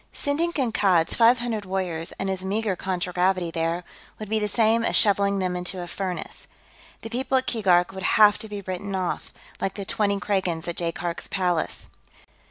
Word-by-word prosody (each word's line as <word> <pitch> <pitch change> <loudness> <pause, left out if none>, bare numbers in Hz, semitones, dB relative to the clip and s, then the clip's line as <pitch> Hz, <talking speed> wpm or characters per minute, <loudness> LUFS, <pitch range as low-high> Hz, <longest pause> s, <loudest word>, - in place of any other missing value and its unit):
Sending 310 +4 0
Kankad's 205 - +2
five 235 +2 +5
hundred 230 -3 -3
warriors 185 -4 -3
and 195 - -2
his 190 -1 -1
meager 205 +1 -1
contragravity 180 -1 0
there 165 +1 -1 0.3
would 215 -2 -7
be 220 0 +1
the 210 - 0
same 225 +2 +3
as - - +1
shoveling 200 -1 +3
them 185 -2 -1
into 180 +1 -3
a - - -5
furnace. 180 +1 -5 0.6
The 225 - -5
people 260 +2 +1
at 260 - +1
Keegark 180 -6 +3
would 190 0 -7 0.2
have 210 -1 +7
to 220 - -5
be 205 -1 -5
written 190 +1 -4
off, 185 -2 -3 0.3
like 195 - -2
the 200 - -5
twenty 200 0 +1
Kragans 185 -5 -1
at 170 - -4
Jaikark's 170 0 -3
palace. 180 -4 -1
195 Hz, 180 wpm, -25 LUFS, 180-215 Hz, 0.6 s, have